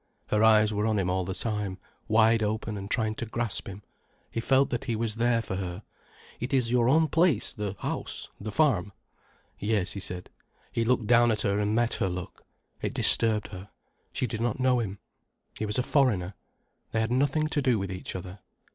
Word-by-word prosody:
Her 105 +1 +2
eyes 110 -1 +5
were 105 +1 0
on 110 -1 +1
him 90 -2 0
all 95 0 0
the 95 +1 -4
time, 105 -2 -2 0.3
wide 110 +1 +4
open 110 0 -2
and 100 0 -6
trying 110 -2 0
to 115 - -4
grasp 115 -1 -2
him. 100 +1 -8 0.5
He - - -2
felt 135 +4 +3
that 125 +3 -2
he 120 -4 -1
was 110 0 -1
there 115 0 +2
for 95 -3 -4
her. 95 +1 -5 0.6
"It 130 +4 -1
is 120 -3 +1
your 120 -1 +3
own 160 +3 +4
place, 165 -1 +2
the 105 -2 -4
house, - - -4
the 105 +1 -5
farm——?" 110 - +2 0.7
"Yes," 105 -4 0
he 100 - -5
said. 90 -1 -7 0.4
He 115 - 0
looked 120 -1 +1
down 120 +1 +5
at 110 -2 0
her 100 0 +1
and 105 +1 +1
met 120 0 +2
her 95 - +2
look. 90 0 -7 0.4
It - - -3
disturbed 110 -2 +3
her. 95 +1 -9 0.4
She - - -1
did 115 -2 -4
not 120 +1 -1
know 130 -1 +3
him. 100 -4 -3 0.6
He 110 - -1
was 105 - -2
a 125 - +2
foreigner, 105 -11 +2 0.6
they 110 - +1
had 110 +1 0
nothing 140 +4 +2
to 150 -2 0
do 125 -4 +2
with 95 -2 -3
each 90 - -6
other. 95 +2 -7
110 Hz, 205 wpm, -28 LUFS, 100-120 Hz, 0.7 s, eyes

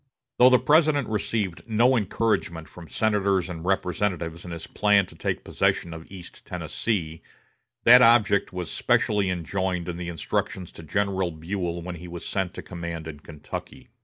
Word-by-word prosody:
Though 125 +1 +9
the 130 - +6
President 145 0 +3
received 105 -4 -2
no 120 +4 +4
encouragement 100 -6 -1
from 85 -4 -13
senators 100 -3 +1
and 80 -2 -7
representatives 90 -2 -1
in 90 - -8
his 85 -1 -6
plan 105 -2 +3
to - - -15
take - - -3
possession 85 - 0
of 80 +2 -11
East 90 -3 -11
Tennessee, 85 -8 -3 0.6
that 125 +2 +9
object 110 -4 +4
was 90 -2 -5
specially 100 -3 +1
enjoined 90 0 -2
in 85 -1 -4
the 85 -1 -5
instructions 85 +2 -3
to - - -11
General 95 +2 0
Buell 85 +1 -4
when 90 0 -6
he 90 +2 -9
was 85 -1 -8
sent 95 -2 -2
to - - -7
command 85 -2 -6
in 75 -3 -8
Kentucky. 90 - -9
90 Hz, 160 wpm, -25 LUFS, 85-105 Hz, 0.6 s, Though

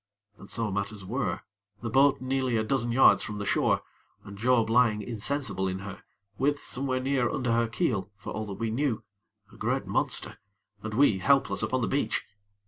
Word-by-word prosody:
And 100 - -13
so 115 -3 -1
matters 100 0 -4
were, - - -2 0.4
the 115 - -3
boat 135 +2 +4
nearly 130 -2 0
a 110 - +1
dozen 120 +1 0
yards 130 +3 +6
from 105 - -4
the 100 - -4
shore, - - +1 0.4
and 100 - -10
Job 115 +1 +2
lying 115 -2 +3
insensible 110 -3 -1
in 95 0 -2
her; 100 +1 -8 0.4
with, 145 +2 +1
somewhere 130 -1 -1
near 130 -2 +1
under 125 -3 -1
her 115 0 +2
keel 115 - -1
(for 95 - -8
all 110 +1 -3
that 100 - -5
we 115 +1 -2
knew) 120 -3 -1 0.5
a - - -15
great - - -1
monster, - - 0 0.4
and 110 0 -5
we 115 -7 +4
helpless 140 +8 +3
upon 130 0 0
the 115 - 0
beach. 135 -6 0
115 Hz, 185 wpm, -28 LUFS, 105-130 Hz, 0.5 s, yards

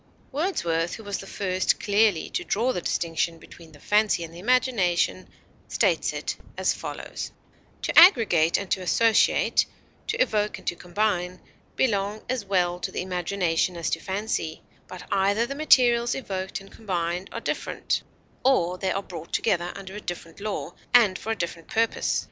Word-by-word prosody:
Wordsworth, 175 - -1
who 220 - -10
was 205 -1 -3
the 195 - -9
first 185 -2 0
clearly 205 -4 +2
to 355 - -2
draw 245 - 0
the 180 - -3
distinction 165 0 -1
between 165 0 -15
the 145 - -16
fancy 210 0 +2
and 165 0 -9
the 170 - -10
imagination, 220 -5 +1 0.4
states - - +1
it - - -4 0.2
as - - +2
follows: - - -6 0.5
To - - -2
aggregate 220 - +7
and 200 - -6
to 190 - +1
associate, 220 +5 +3 0.4
to - - -1
evoke 210 -4 +1
and - - -15
to - - -1
combine, 180 -1 -1 0.4
belong 205 -3 0
as 255 -3 -1
well 180 -3 +1
to - - -4
the - - -3
imagination 180 -1 0
as 170 - -2
to 165 - 0
the - - -16
fancy; 190 -5 -3 0.2
but 185 - -9
either 200 +4 +2
the 270 - -5
materials 245 -5 +4
evoked 190 -7 -4
and 195 0 -15
combined 180 -3 -3
are - - -4
different; - - -2 0.4
or 180 -9 +2
they 190 - -1
are 195 - -2
brought 170 -3 -9
together 175 -1 0
under 195 -1 -8
a 210 - -6
different 170 -3 -7
law, 210 0 -4 0.2
and 210 -6 +5
for 225 - -3
a - - 0
different 170 -1 -4
purpose. 225 0 +1
195 Hz, 170 wpm, -25 LUFS, 175-220 Hz, 0.5 s, aggregate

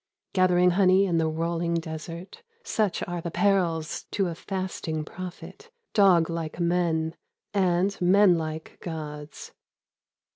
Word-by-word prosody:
Gathering 180 -1 +4
honey 190 +1 +4
in 170 -3 +1
the 160 -1 +1
roUing 170 +1 -1
desert, 165 - -8 0.2
Such 210 -4 0
are 175 -1 -3
the 170 - -4
perils 170 -5 0
to 195 -3 0
a - - -4
fasting 170 -4 -4
prophet 185 - -9
— 460 - -53
Dog 185 -6 +5
hkc 165 -1 -4
men, 170 -2 +1 0.4
and 190 0 +2
men 190 +1 +6
hke 160 0 -6
gods. 150 -3 -7
175 Hz, 125 wpm, -26 LUFS, 160-185 Hz, 0.4 s, men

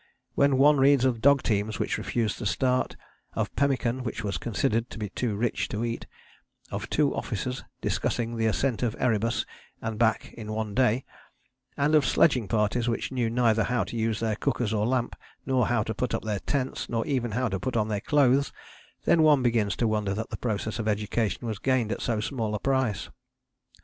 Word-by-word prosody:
When 140 -1 +3
one 145 +1 +5
reads 135 -1 +5
of 120 -4 +1
dog 140 +1 +5
teams 105 0 0
which - - -1
refused 115 -4 -1
to 120 - -5
start, 125 +7 +1 0.4
of - - -2
pemmican 130 -2 +1
which 115 -2 -4
was 100 -4 -2
considered 115 +2 0
to - - -9
be 105 -2 -4
too 110 +1 -2
rich 115 +3 -1
to 110 +3 -2
eat, 115 0 -4 0.6
of - - -4
two 145 -2 +2
officers 125 +4 -3 0.2
discussing 115 0 -1
the 115 -1 +1
ascent 120 +2 0
of 120 -3 0
Erebus 115 -2 +1 0.3
and 110 -2 -4
back 110 -2 +1
in 110 -2 -6
one 110 -1 -3
day, 125 0 +2 0.7
and 145 +2 +2
of 155 -2 +6
sledging 130 -5 +3
parties 110 +3 +1
which 115 - -2
knew 125 -3 0
neither 115 -2 +2
how 125 0 +1
to - - -7
use 115 -1 0
their 110 -2 0
cookers 115 -2 -1
or 105 0 +1
lamp, 125 -1 0 0.3
nor 130 -3 +2
how 120 -3 +1
to 110 - -3
put 125 +2 -1
up - - -4
their 105 -2 -2
tents, 135 +2 -2
nor 115 -1 -1
even 130 -5 0
how 125 +3 +1
to 95 -3 -2
put 120 +6 -2
on 105 -1 +1
their 105 -2 -2
clothes, 140 0 +3 0.5
then 165 - +4
one 150 -4 +5
begins 115 -4 +1
to 115 - +1
wonder 105 -2 0
that 110 +2 -4
the - - -4
process 110 -1 -2
of 110 - -2
education 105 +2 -1
was 110 -4 -3
gained 130 -4 +1
at - - -3
so 115 -2 0
small 110 -2 -2
a - - -2
price. 130 -4 0
115 Hz, 200 wpm, -27 LUFS, 110-130 Hz, 0.7 s, of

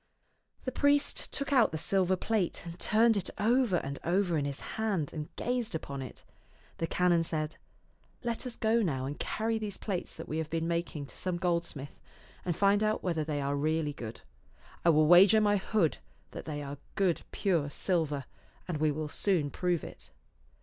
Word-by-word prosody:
The 255 - -1
priest 285 +2 +2
took 280 0 -1
out 250 -4 +5
the 160 - -2
silver 185 +3 +2
plate, 190 -3 -1
and 170 +1 -8
turned 225 +1 +4
it 195 - -1
over 230 -1 +3
and 140 -4 -2
over 180 0 +1
in 145 -2 0
his 140 -1 -3
hand, 200 -9 -2
and 150 -1 -5
gazed 240 -5 -1
upon 140 -3 -5
it. 130 - -9 0.6
The 165 - 0
canon 175 -1 +3
said, 155 -1 -2 0.3
" - - -34 0.3
Let 235 +1 -2
us 240 - -5
go 225 +1 +2
now 135 -10 -1
and 145 +2 -5
carry 225 +1 -1
these 210 -2 -4
plates 190 -5 -3
that - - -8
we 155 - -2
have 160 -1 -3
been 165 0 -1
making 170 -3 -2
to - - -12
some 185 -2 -2
goldsmith, 170 -5 -2 0.4
and 175 -2 -1
find 200 +2 +3
out 215 0 +1
whether 165 -4 0
they 150 -1 -2
are 140 +1 0
really 155 +1 0
good. 115 -5 -8 0.6
I 170 - +5
will 155 -1 +5
wager 190 +7 +8
my 205 -1 +3
hood 190 -4 +1 0.3
that - - -7
they 145 -2 -4
are 140 0 -7 0.2
good 185 -4 +2
pure 170 -8 +1
silver, 150 -5 0 0.4
and 170 -5 -2
we 155 0 +3
will 150 +1 -2
soon 155 -2 +1
prove 180 0 0
it." - - -10
175 Hz, 190 wpm, -31 LUFS, 155-205 Hz, 0.6 s, wager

